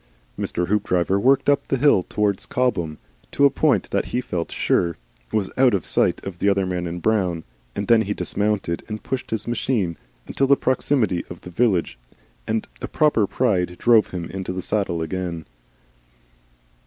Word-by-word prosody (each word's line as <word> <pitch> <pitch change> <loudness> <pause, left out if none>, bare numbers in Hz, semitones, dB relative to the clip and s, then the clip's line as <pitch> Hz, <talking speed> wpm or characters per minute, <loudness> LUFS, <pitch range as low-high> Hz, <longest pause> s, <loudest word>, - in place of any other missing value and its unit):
Mr. 90 0 -2
Hoopdriver 95 -2 +1
worked 135 +5 +3
up 145 -1 +2
the 135 - 0
hill 140 -8 +4
towards 100 +1 -1
Cobham 85 -12 -1 0.3
to 140 - +3
a 140 - +5
point 135 - +1
that - - 0
he 125 - -2
felt 90 -10 -4
sure 85 -1 +1 0.3
was 100 -3 -1
out 130 -4 +5
of 95 - -2
sight - - +1
of 95 -3 -7
the 100 - +3
other 100 -1 +2
man 90 -1 -2
in 85 +1 -5
brown, 90 -5 0 0.3
and 100 - -3
then 115 -1 +5
he 105 -1 -2
dismounted 100 -4 -1
and 105 0 -6
pushed 130 -1 -4
his 110 0 -3
machine; 115 -7 -1 0.3
until 135 - 0
the 140 0 +5
proximity 125 -7 +1
of 90 - -9
the 90 - -10
village 90 - +1 0.5
and 110 0 -1
a - - -3
proper 150 -10 +2
pride 90 -9 0
drove 115 -3 +4
him 90 -2 -5
into 95 -1 -4
the 90 0 -4
saddle 90 -6 -1
again. 85 -1 -4
100 Hz, 175 wpm, -22 LUFS, 90-120 Hz, 0.5 s, a